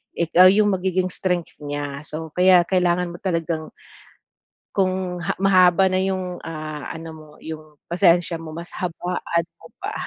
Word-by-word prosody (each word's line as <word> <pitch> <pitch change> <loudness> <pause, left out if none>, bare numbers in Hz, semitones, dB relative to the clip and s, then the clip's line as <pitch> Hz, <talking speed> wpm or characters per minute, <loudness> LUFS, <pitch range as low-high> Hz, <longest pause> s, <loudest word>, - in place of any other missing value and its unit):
ikaw 170 +2 +5
yung 205 +1 +3
magiging 185 -1 0
strength 180 -2 -2
niya. 145 -1 -4
So, 160 0 -6
kaya 180 -1 +6
kailangan 180 -1 +1
mo 175 - -8
talagang 165 -4 -2 1.0
kung 185 -2 -1
ha - - -2
mahaba 185 -1 +5
na 185 0 +1
yung, 185 -2 -3
ah, 155 -3 -6
ano 165 0 -7
mo, 155 -1 -13
yung 155 -1 -9
pasensya 170 -1 +2
mo, 160 - -8
mas 170 +1 -9
habaan 175 -1 -2 0.2
mo - - -14
pa. - - -5
175 Hz, 150 wpm, -22 LUFS, 160-185 Hz, 1.0 s, kaya